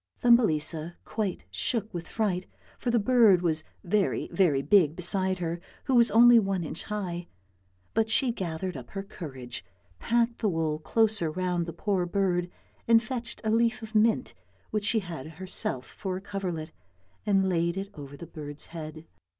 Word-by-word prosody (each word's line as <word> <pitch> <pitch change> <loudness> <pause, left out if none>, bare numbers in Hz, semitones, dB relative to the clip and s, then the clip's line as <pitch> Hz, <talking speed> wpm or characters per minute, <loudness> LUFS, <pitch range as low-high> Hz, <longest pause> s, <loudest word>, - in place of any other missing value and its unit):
Thumbelisa 170 -8 +3
quite 205 -5 -3
shook 225 -3 -1
with 170 -1 -5
fright, 190 -5 -1 0.3
for 245 - -2
the 235 - +3
bird 220 -5 +5
was 160 -2 +1 0.2
very, 195 +2 0
very 150 -8 +3
big 170 -6 +4
beside 185 +1 +2
her 170 -1 -3 0.2
who 270 - -1
was 235 -2 +6
only 235 +1 +8
one 195 -4 -1
inch 160 - -6
high, 180 -5 -4 0.7
but 220 0 +2
she 245 +3 +2
gathered 180 -4 -4
up 125 -3 -8
her 195 0 -5
courage, 135 - -7 0.4
packed 235 0 +1
the 215 - +1
wool 160 -3 -1
closer 215 -1 +2
round 180 0 -1
the - - -3
poor 180 +1 -1
bird, 180 -2 0 0.4
and 230 0 +6
fetched 240 +1 -5
a 220 - +1
leaf 230 +1 +2
of 220 0 -9
mint 220 - +2 0.4
which 215 -1 -1
she 220 +1 +2
had 165 -7 -7
herself 160 -7 -1
for 190 -2 -5
a - - -7
coverlet 180 -6 -4 0.6
and 195 -2 +3
laid 170 0 +1
it 195 +1 -4
over 145 -2 -9
the 170 - -8
bird's 150 -3 -8
head. 155 -1 -7
185 Hz, 165 wpm, -28 LUFS, 165-220 Hz, 0.7 s, only